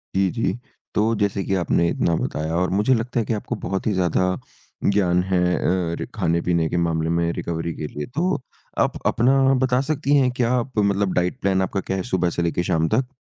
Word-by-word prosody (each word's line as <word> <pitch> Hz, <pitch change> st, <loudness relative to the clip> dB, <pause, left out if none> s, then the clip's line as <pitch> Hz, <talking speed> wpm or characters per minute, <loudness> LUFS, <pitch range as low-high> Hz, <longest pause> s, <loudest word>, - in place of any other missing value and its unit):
जी, 95 Hz, -1 st, +3 dB
जी, 115 Hz, -, 0 dB, 0.4 s
तो 110 Hz, +2 st, +2 dB
जैसे 100 Hz, -1 st, 0 dB
कि 95 Hz, -, -2 dB
आपने 85 Hz, -1 st, +1 dB
इतना 85 Hz, -, +1 dB
बताया 80 Hz, +1 st, -2 dB
और 90 Hz, +1 st, +1 dB
मुझे 130 Hz, +5 st, +3 dB
लगता 120 Hz, +1 st, -1 dB
है 110 Hz, -, 0 dB
कि 115 Hz, -, -1 dB
आपको 110 Hz, +3 st, -3 dB
बहुत 95 Hz, 0 st, -3 dB
ही 105 Hz, -, +2 dB
ज़्यादा 90 Hz, -1 st, +1 dB, 0.6 s
ज्ञान 90 Hz, -3 st, +3 dB
है 95 Hz, -1 st, 0 dB, 0.2 s
अ, 90 Hz, -2 st, 0 dB
रि -, -, -3 dB
खाने-पीने 85 Hz, -3 st, +1 dB
के 90 Hz, -, -1 dB
मामले 80 Hz, -1 st, 0 dB
में 85 Hz, 0 st, +1 dB
रिकवरी 85 Hz, 0 st, -3 dB
के 75 Hz, -, -4 dB
लिए, 75 Hz, 0 st, -5 dB
तो 160 Hz, +3 st, -1 dB, 0.4 s
आप -, -, +1 dB
अपना 135 Hz, +4 st, +3 dB, 0.2 s
बता 125 Hz, 0 st, +2 dB
सकती 145 Hz, -1 st, +1 dB
हैं 130 Hz, -2 st, +3 dB
क्या 125 Hz, -1 st, 0 dB
आप 125 Hz, -1 st, -2 dB
मतलब 100 Hz, -1 st, +1 dB
डाइट 90 Hz, 0 st, 0 dB
प्लान 95 Hz, -1 st, +2 dB
आपका 95 Hz, +1 st, -1 dB
क्या 95 Hz, -, 0 dB
है 95 Hz, -, -2 dB
सुबह 90 Hz, -6 st, 0 dB
से 85 Hz, -, -2 dB
लेके 85 Hz, +1 st, 0 dB
शाम 80 Hz, -2 st, +1 dB
तक? 125 Hz, +4 st, 0 dB
95 Hz, 210 wpm, -22 LUFS, 85-115 Hz, 0.6 s, जी